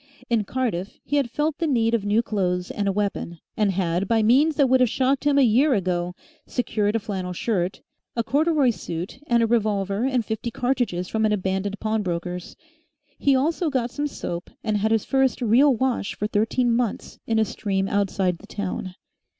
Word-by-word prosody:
In 220 Hz, -3 st, +2 dB
Cardiff 215 Hz, -6 st, -2 dB
he 290 Hz, -, 0 dB
had 275 Hz, -4 st, +1 dB
felt 300 Hz, +4 st, -1 dB
the 330 Hz, -, 0 dB
need 230 Hz, -5 st, +2 dB
of 230 Hz, -4 st, +1 dB
new 210 Hz, +3 st, +2 dB
clothes 180 Hz, -5 st, -1 dB
and 205 Hz, -1 st, -2 dB
a -, -, +3 dB
weapon, 195 Hz, -4 st, -2 dB, 0.2 s
and 210 Hz, -2 st, +2 dB
had, 180 Hz, 0 st, 0 dB
by 225 Hz, -1 st, +2 dB
means 280 Hz, +8 st, +4 dB
that 280 Hz, -, +4 dB
would 260 Hz, +1 st, +4 dB
have 250 Hz, -2 st, +4 dB
shocked 270 Hz, +4 st, +1 dB
him 290 Hz, -1 st, +3 dB
a 280 Hz, -, +6 dB
year 255 Hz, +4 st, +4 dB
ago, 180 Hz, -2 st, -1 dB, 0.3 s
secured 215 Hz, -4 st, 0 dB
a -, -, +2 dB
flannel 190 Hz, -4 st, -4 dB
shirt, 185 Hz, -1 st, -1 dB, 0.3 s
a 230 Hz, -, 0 dB
corduroy 290 Hz, 0 st, +2 dB
suit, 175 Hz, +1 st, -6 dB
and 235 Hz, -1 st, +3 dB
a -, -, +4 dB
revolver 210 Hz, -2 st, 0 dB
and 255 Hz, -4 st, 0 dB
fifty 220 Hz, +2 st, -3 dB
cartridges 240 Hz, -8 st, -1 dB
from 220 Hz, +3 st, -1 dB
an 215 Hz, -, +3 dB
abandoned 190 Hz, 0 st, -1 dB
pawnbroker's. 180 Hz, -5 st, -3 dB, 0.6 s
He 280 Hz, -1 st, +3 dB
also 320 Hz, +5 st, +1 dB
got 250 Hz, -4 st, -1 dB
some 295 Hz, +2 st, -2 dB
soap 175 Hz, -10 st, -5 dB
and 215 Hz, -2 st, 0 dB
had 215 Hz, +2 st, +1 dB
his 225 Hz, -2 st, +2 dB
first 265 Hz, -1 st, +2 dB
real 250 Hz, +4 st, +5 dB
wash 250 Hz, -3 st, -1 dB
for 210 Hz, -, -3 dB
thirteen 225 Hz, +3 st, +1 dB
months 235 Hz, -3 st, -2 dB
in 225 Hz, -, +1 dB
a 220 Hz, -, +3 dB
stream 195 Hz, -2 st, -2 dB
outside 195 Hz, -3 st, 0 dB
the 205 Hz, -, -14 dB
town. 185 Hz, -3 st, -4 dB
220 Hz, 190 wpm, -24 LUFS, 195-255 Hz, 0.6 s, a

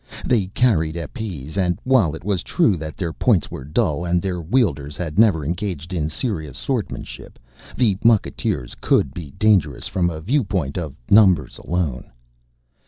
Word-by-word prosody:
They 110 Hz, -7 st, +2 dB
carried 95 Hz, -8 st, +1 dB
épées 85 Hz, -, -6 dB
and, 90 Hz, -3 st, +1 dB
while 115 Hz, -, +3 dB
it -, -, -10 dB
was 100 Hz, -2 st, -1 dB
true 160 Hz, -, +2 dB
that 80 Hz, -2 st, -7 dB
their 85 Hz, -4 st, -3 dB
points 65 Hz, -, +1 dB
were -, -, -6 dB
dull 80 Hz, -, 0 dB
and 90 Hz, 0 st, +1 dB
their 90 Hz, -1 st, -3 dB
wielders 80 Hz, -, 0 dB
had 85 Hz, 0 st, -3 dB
never 95 Hz, -10 st, +4 dB
engaged 85 Hz, 0 st, -4 dB
in 80 Hz, -3 st, -1 dB
serious 80 Hz, -, -3 dB
swordsmanship, -, -, -4 dB, 0.4 s
the 110 Hz, -6 st, +3 dB
mucketeers 105 Hz, -, +1 dB
could 65 Hz, -, +2 dB
be 80 Hz, -3 st, -7 dB
dangerous 95 Hz, -, +2 dB
from 85 Hz, -2 st, 0 dB
a 80 Hz, -2 st, -5 dB
viewpoint 95 Hz, -, -1 dB
of 80 Hz, -6 st, -4 dB, 0.2 s
numbers 95 Hz, -, +5 dB
alone. 75 Hz, -8 st, -2 dB
85 Hz, 155 wpm, -21 LUFS, 75-100 Hz, 0.4 s, numbers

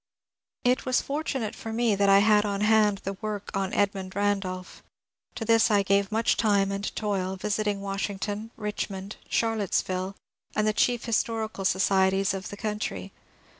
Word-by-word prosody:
It 250 Hz, +1 st, +2 dB
was 255 Hz, -1 st, +2 dB
fortunate 275 Hz, -6 st, -3 dB
for 225 Hz, -, -7 dB
me 230 Hz, -1 st, +2 dB
that 200 Hz, 0 st, +2 dB
I 195 Hz, -, +7 dB
had 210 Hz, -1 st, +5 dB
on 200 Hz, -1 st, -2 dB
hand 210 Hz, -2 st, +3 dB
the 195 Hz, -, -3 dB
work 210 Hz, -2 st, -4 dB
on 195 Hz, 0 st, -1 dB
Edmund 195 Hz, -2 st, -1 dB
Randolph. 195 Hz, -2 st, -2 dB, 0.5 s
To 225 Hz, -, -4 dB
this 225 Hz, +1 st, +4 dB
I 205 Hz, -2 st, +3 dB
gave 200 Hz, +1 st, +2 dB
much 225 Hz, +2 st, +2 dB
time 200 Hz, -3 st, +2 dB
and 200 Hz, +1 st, -3 dB
toil, 190 Hz, -3 st, -1 dB
visit 210 Hz, +2 st, -1 dB
ing 200 Hz, -1 st, -1 dB
Washington, 200 Hz, +2 st, -3 dB
Richmond, 205 Hz, -2 st, -4 dB
Charlottesville, 195 Hz, -4 st, 0 dB, 0.4 s
and 215 Hz, -, +2 dB
the 215 Hz, -, +2 dB
chief 240 Hz, +2 st, +1 dB
historical 220 Hz, -3 st, -1 dB
societies 190 Hz, 0 st, +2 dB
of 190 Hz, -1 st, -5 dB
the 205 Hz, -, -8 dB
country. 210 Hz, 0 st, -4 dB
205 Hz, 160 wpm, -27 LUFS, 195-220 Hz, 0.5 s, I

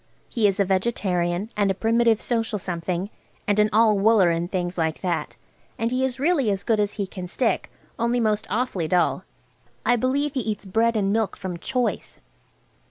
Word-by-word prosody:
He 225 Hz, -4 st, +2 dB
is 200 Hz, 0 st, -1 dB
a 200 Hz, -, +4 dB
vegetarian 185 Hz, -1 st, 0 dB
and 205 Hz, -1 st, +2 dB
a 195 Hz, -, +1 dB
Primitive 225 Hz, +1 st, +2 dB
Social 225 Hz, -3 st, -1 dB
Something, 180 Hz, +1 st, -3 dB, 0.4 s
and 205 Hz, 0 st, +2 dB
an 210 Hz, 0 st, +4 dB
all 215 Hz, -1 st, +4 dB
wooler, 200 Hz, -4 st, +5 dB
and 170 Hz, +1 st, -2 dB
things 180 Hz, -1 st, -2 dB
like 160 Hz, -2 st, -1 dB
that, 175 Hz, -3 st, -2 dB, 0.4 s
and 230 Hz, +1 st, -1 dB
he 255 Hz, +1 st, 0 dB
is 260 Hz, -1 st, -2 dB
really 285 Hz, -5 st, +2 dB
as 195 Hz, -1 st, -1 dB
good 225 Hz, -2 st, +1 dB
as 205 Hz, 0 st, 0 dB
he 200 Hz, -, -2 dB
can 185 Hz, -1 st, -7 dB
stick, 250 Hz, -, -1 dB, 0.3 s
only 235 Hz, +1 st, +1 dB
most 215 Hz, -2 st, 0 dB
awfully 210 Hz, -8 st, -1 dB
dull. 175 Hz, +2 st, +1 dB, 0.6 s
I 245 Hz, -, +4 dB
believe 275 Hz, +4 st, 0 dB
he 270 Hz, -, -1 dB
eats 215 Hz, -4 st, -3 dB
bread 225 Hz, +4 st, +1 dB
and 200 Hz, -2 st, +1 dB
milk 220 Hz, -2 st, 0 dB
from 185 Hz, -3 st, -5 dB
choice. 245 Hz, -3 st, -2 dB
210 Hz, 185 wpm, -24 LUFS, 185-230 Hz, 0.6 s, wooler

